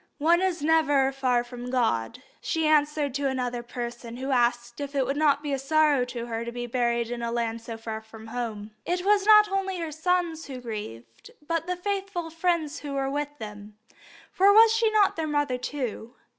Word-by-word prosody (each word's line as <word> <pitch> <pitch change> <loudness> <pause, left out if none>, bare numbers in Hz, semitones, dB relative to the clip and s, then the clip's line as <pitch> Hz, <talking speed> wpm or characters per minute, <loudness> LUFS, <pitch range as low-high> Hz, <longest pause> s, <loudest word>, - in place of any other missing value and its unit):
"One 335 +4 +3
is 365 -5 -1
never 290 -4 +3
far 255 -3 +1
from 245 0 -8
God," 240 - 0 0.2
she 320 -2 -1
answered 300 -2 +2
to 280 +1 0
another 250 -2 -2
person 240 0 -6
who 265 +2 -3
asked 240 -1 +1
her 285 - -2
if 280 0 -12
it 270 -2 +2
would 275 +2 -1
not 290 -1 +2
be 290 -2 -2
a. 270 - -1
sorrow 295 -2 +3
to 240 -1 -6
her 230 -1 -4
to 235 - -5
be 240 0 -5
buried 235 -1 0
in 240 -1 -4
a 235 0 -2
land 230 -1 -2
so 230 0 -7
far 220 -1 -6
from 220 0 -13
home. 225 -3 -5
It 360 +1 -2
was 410 0 +3
not 425 -1 +8
only 385 -1 -1
her 330 -2 -4
sons 330 0 -1
who 265 -2 -7
grieved, 165 - -8 0.2
but 330 0 -1
the 360 - -1
faithful 385 -3 -3
friends 330 -2 -1
who 290 -2 -6
were 270 0 -1
with 290 +1 -3
them, 210 -2 -9 0.5
for 390 +2 +5
was 445 +2 +7
she 450 0 +3
not 425 -4 +3
their 320 -1 -1
mother 290 -4 0
too? 245 -3 -5
275 Hz, 205 wpm, -26 LUFS, 240-320 Hz, 0.5 s, not